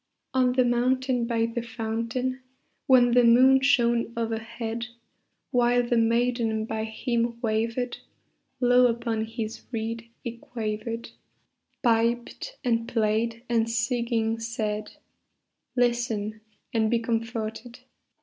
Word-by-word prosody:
On 255 -1 +3
the 255 0 +3
mountain 250 0 +1
by 230 -1 +1
the 230 +1 -3
fountain, 230 +3 -3 0.5
When 245 -2 +6
the 245 0 +5
moon 255 +3 +6
shone 235 -4 +3
overhead, 230 +1 -3 0.6
While 245 -1 +3
the 240 - +1
maiden 230 -1 +1
by 220 0 -3
him 235 +1 -1
wavered, 230 +2 -1 0.6
Low 250 0 +5
upon 230 -2 -1
his 225 0 -5
reed 230 0 -4
he 235 0 -5
quavered, 230 0 -4 0.7
Piped 235 - 0
and 230 -2 +1
played 230 +1 0
and 230 -1 +1
singing 230 -1 0
said, 215 -2 -3 0.8
"Listen 235 -4 0 0.3
and 220 -2 +2
be 235 - +3
comforted! 230 0 -3
235 Hz, 110 wpm, -26 LUFS, 225-245 Hz, 0.8 s, When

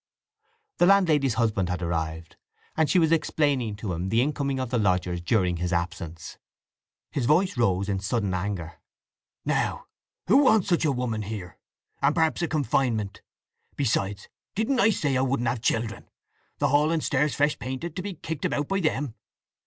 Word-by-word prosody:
The 175 - +5
landlady's 155 - +4
husband 105 -6 +1
had 90 -1 -2
arrived, 80 -1 -3 0.4
and 160 -1 +2
she - - +3
was 165 -2 +4
explaining 145 -8 +1
to 105 -3 -4
him 90 +3 -3
the 115 - +2
incoming 140 -2 -1
of 130 -2 -3
the 120 - +1
lodgers 90 -3 +1
during 90 -2 +1
his 90 +1 -2
absence. 85 -1 -4 0.7
His 125 -4 -1
voice 175 +5 +3
rose 100 -5 +1
in 100 -2 -1
sudden 100 -1 -1
anger. 90 -3 -4 0.7
"Now - - -1 0.4
who - - +5
wants 220 -8 +4
such 170 -2 +2
a 150 - +3
woman 125 -4 -2
here? 100 -4 -7 0.4
and 140 +2 +3
perhaps 160 0 +2
a 170 - +1
confinement!… 120 -8 0 0.5
Besides, 105 -6 -1 0.3
didn't 225 +5 +1
I 205 - +5
say 145 -9 0
I 130 - +2
wouldn't 130 -2 0
have 120 -1 -1
children? 115 -1 -1 0.5
The - - +1
hall 145 +2 +3
and 165 -2 0
stairs 145 +1 +1
fresh 145 +1 +1
painted, 130 +6 -5
to - - -3
be 195 0 -5
kicked 160 -3 -5
about 145 0 -1
by 195 - +1
them! 145 - -1
125 Hz, 170 wpm, -26 LUFS, 100-150 Hz, 0.7 s, The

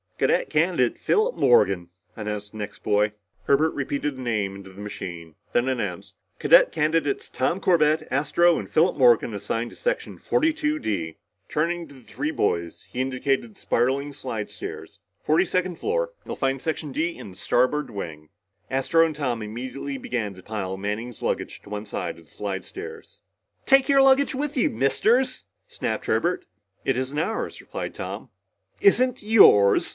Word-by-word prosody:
"Cadet - - +1
Candidate - - +2
Philip 445 +3 +2
Morgan," 95 -7 +3 0.3
announced 105 -1 -5
the 110 - -11
next 105 0 -7
boy. 105 +1 +2 0.3
Herbert 155 +3 +3
repeated 140 0 -2
the - - -7
name 105 -5 -1
into 95 -1 -11
the 95 +2 -11
machine, 85 -5 -7 0.2
then 120 +2 +2
announced, 130 -1 -3 0.2
"Cadet - - +6
Candidates 155 -2 0
Tom 150 +8 0
Corbett, 155 -4 +3
Astro, 155 +5 +3
and - - -7
Philip 165 +2 +3
Morgan 120 -4 +5
assigned 115 +4 -3
to - - -13
Section - - -2
42 310 -1 +1
D." 80 - -3 0.3
Turning 170 +2 -1
to 140 - -15
the 130 - -15
three 295 - -4
boys, 85 - -1
he 125 - -3
indicated 130 -2 -1
the - - -17
spiraling 135 +4 0
slidestairs. 115 -6 -6 0.2
"Forty 160 +5 +3
second 185 -1 -1
floor. - - -1
You'll - - -5
find 135 -1 -1
Section 155 -2 -3
D 165 +5 -1
in - - -9
the - - -14
starboard 140 +4 +1
wing." 80 -6 -7 0.4
Astro 135 +5 +3
and 160 -2 -3
Tom 125 -6 -2
immediately 130 +6 -5
began 115 -6 -3
to 95 - -14
pile 95 -3 -4
Manning's 105 +4 -4
luggage - - -2
to - - -14
one 105 +1 -5
side 85 -5 -4
of 85 - -18
the - - -20
slidestairs. 385 - -7 0.4
"Take 270 +1 +5
your 275 -1 +6
luggage 270 +1 +4
with 295 +2 -2
you, 255 - +3
Misters!" 230 - +1 0.2
snapped - - -3
Herbert. - - 0 0.4
"It 135 - +2
isn't 130 +3 -3
ours," 220 +8 -2
replied - - -6
Tom. - - -6 0.5
"Isn't 255 - +3
yours?" 150 - +6
135 Hz, 160 wpm, -25 LUFS, 105-175 Hz, 0.5 s, Cadet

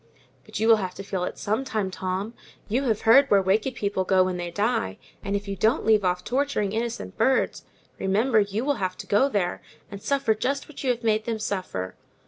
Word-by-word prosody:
"But - - -6
you 220 - +2
will 225 -1 +7
have 185 -3 -4
to 195 - -7
feel 190 -2 -2
it - - -6
some 215 +6 -1
time, 215 -7 -2
Tom: 190 +4 -3 0.3
you 250 +6 0
have 220 -4 +1
heard 275 +5 +6
where 200 - +6
wicked 210 +7 +1
people 200 -3 -1
go 185 0 +3
to - - +6
when 185 -1 -2
they 175 0 -4
die; 205 - -1 0.3
and 200 0 -2
if 200 0 -3
you 200 - -3
don't 220 +8 +1
leave 215 -2 +4
off 180 0 0
torturing 255 -6 0
innocent 225 - -3
birds, 265 0 +1 0.3
remember, 215 +5 +2
you 205 +4 -1
will 285 -1 +1
have 185 -1 -2
to - - -8
go 260 +7 +3
there, 195 -7 -1 0.3
and 200 -1 -8
suffer 245 +1 +1
just 275 +6 -2
what 305 - -9
you 260 - 0
have 240 -1 0
made 220 -1 +1
them 230 -1 -1
suffer." 185 - -3
210 Hz, 225 wpm, -25 LUFS, 190-235 Hz, 0.3 s, will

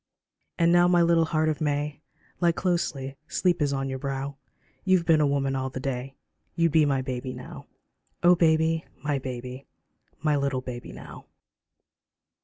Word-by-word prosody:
And 170 0 +4
now 175 0 +6
my 175 -1 +4
little 170 -1 +4
heart 155 -1 +1
of 155 -1 -1
May, 145 0 -1 0.4
Lie 170 -1 +3
closely, 145 -7 -2
sleep 175 0 +1
is 145 -1 +2
on 135 -1 -1
your 130 0 -4
brow, 140 0 -3 0.5
You've 185 -3 +3
been 160 -2 +4
a 150 - +4
woman 135 -1 0
all 130 0 -2
the 130 - -6
day, 135 0 -4 0.4
You'd 165 -1 +2
be 155 0 +5
my 135 -2 +1
baby 130 0 -4
now; - - -10 0.6
Oh 175 +1 +7
baby, 160 -1 +3 0.2
my 145 -2 0
baby! 125 +1 -7 0.5
My 150 -2 +1
little 140 -2 0
baby 125 -1 -7
now. - - -11
145 Hz, 165 wpm, -26 LUFS, 135-165 Hz, 0.6 s, Oh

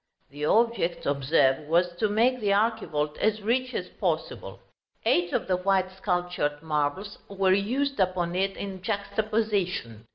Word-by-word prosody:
The 145 +1 -4
object, 225 -3 +1
observe, 140 0 +2
was 175 +2 +2
to 215 +3 +1
make 240 +5 +2
the 205 -3 0
archivolt 200 -8 0
as 215 -1 +1
rich 255 +4 0
as - - -2
possible; - - -3 0.5
eight 175 0 +2
of - - -1
the 185 -1 +1
white 185 0 +1
sculptured 180 -6 -2
marbles 155 +6 -2
were 195 -1 +2
used 260 +8 0
upon 180 -2 0
it 195 +1 0
in 195 -2 -6
juxtaposition. 200 - -2
190 Hz, 140 wpm, -27 LUFS, 165-210 Hz, 0.5 s, observe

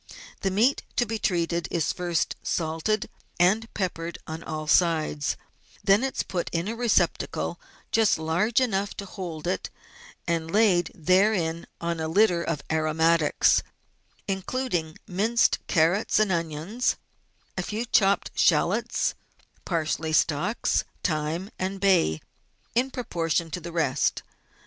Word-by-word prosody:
The 195 - 0
meat 225 +9 +2
to 245 - +2
be 225 0 -3
treated 170 -3 0
is 165 -4 0
first 175 -3 -1
salted 165 +6 -1 0.3
and 210 +6 +3
peppered 170 -3 -3
on 160 +1 -6
all 155 -1 -5
sides, 155 -3 +2 0.5
then 200 +5 +4
it 270 0 -2
is - - +1
put 175 -2 -3
in 170 +2 -1
a 225 - -3
receptacle 235 -2 0 0.3
just 225 -2 +3
large 175 +9 +1
enough 205 -6 -1
to 200 - -5
hold 175 -5 -7
it, 180 - -2 0.6
and 165 -1 -1
laid 185 -3 +3
therein 180 -1 +2
on 170 -1 -2
a 160 - -2
litter 175 0 +3
of 160 -5 -3
aromatics, 160 0 +3 0.7
including 190 -4 -2
minced 220 +6 +2
carrots 170 +5 +2
and 215 -2 +3
onions, 170 +7 -1 0.6
a - - -1
few 220 +3 -3
chopped 200 -4 +2
shallots, - - +2 0.5
parsley 160 -2 -1
stalks, 165 +9 +1 0.2
thyme, 165 +4 -1
and 190 +1 -2
bay 180 - +3 0.5
in 250 +3 +2
proportion 170 - -2
to 180 - -3
the 170 0 -8
rest. 150 -5 0
175 Hz, 130 wpm, -26 LUFS, 160-205 Hz, 0.7 s, then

